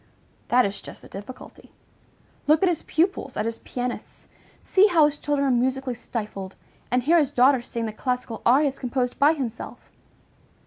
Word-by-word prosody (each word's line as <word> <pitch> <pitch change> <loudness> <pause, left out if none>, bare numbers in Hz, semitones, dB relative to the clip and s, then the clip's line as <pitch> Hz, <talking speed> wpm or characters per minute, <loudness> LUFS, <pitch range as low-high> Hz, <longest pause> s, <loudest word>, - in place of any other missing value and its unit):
That 250 +1 +4
is 200 0 -4
just - - -12
the - - -12
difficulty. 205 +6 -11 0.8
Look 310 +4 +4
at 375 - +5
his 340 - -1
pupils, 325 -5 -1
at 215 - -1
his 230 0 -3
pianists! 245 -1 -6 0.3
See 395 +2 +5
how 335 -6 +5
his 295 0 -1
children 285 -1 0
are - - +2
musically 255 +1 0
stifled, 210 -5 -6 0.3
and 250 0 +1
hear 335 +6 +5
his 290 -4 +2
daughter 255 +1 +4
sing 235 -1 -4
the 215 - -4
classical 250 -1 -3
arias 275 +2 +3
composed 250 -1 -2
by 290 +3 +6
himself! 250 -7 -6
255 Hz, 170 wpm, -24 LUFS, 240-290 Hz, 0.8 s, by